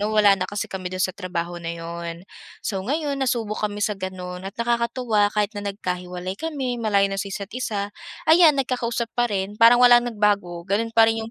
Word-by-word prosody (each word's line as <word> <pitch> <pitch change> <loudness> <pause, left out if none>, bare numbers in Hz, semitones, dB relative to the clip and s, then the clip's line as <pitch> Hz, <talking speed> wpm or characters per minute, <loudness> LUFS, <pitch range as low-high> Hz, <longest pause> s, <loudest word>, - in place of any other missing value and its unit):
no'ng 210 +1 0
wala 205 -2 +7
na 185 -1 -3
kasi 205 0 -3
kami 185 -1 -5
do'n 185 0 0
sa 185 - -1
trabaho 175 -2 -4
na 170 0 -5
'yon. 170 +1 -6 0.4
So 195 -2 -2
ngayon 285 +3 -2
nasubok 225 -5 -1
kami 205 0 -2
sa 210 - 0
gano'n 185 -1 -6
at - - -14
nakakatuwa 235 -2 +1
kahit 210 0 0
na 205 0 -4
nagkahiwalay 180 -1 -4
kami, 265 -5 -3
malayo 200 -3 +3
na 195 - -2
sa 200 - -4
isa't 200 +1 -6
isa, 205 -5 -3 0.3
ayan 320 -2 +6
nagkakausap 240 -3 -1
pa 240 0 +1
rin, 200 0 -2
parang 230 +1 +8
walang 245 -1 +6
nagbago, 200 -6 0
gano'n 215 +4 0
pa 225 - +8
rin 225 0 +1
'yong 220 +1 -6
205 Hz, 200 wpm, -23 LUFS, 185-235 Hz, 0.4 s, parang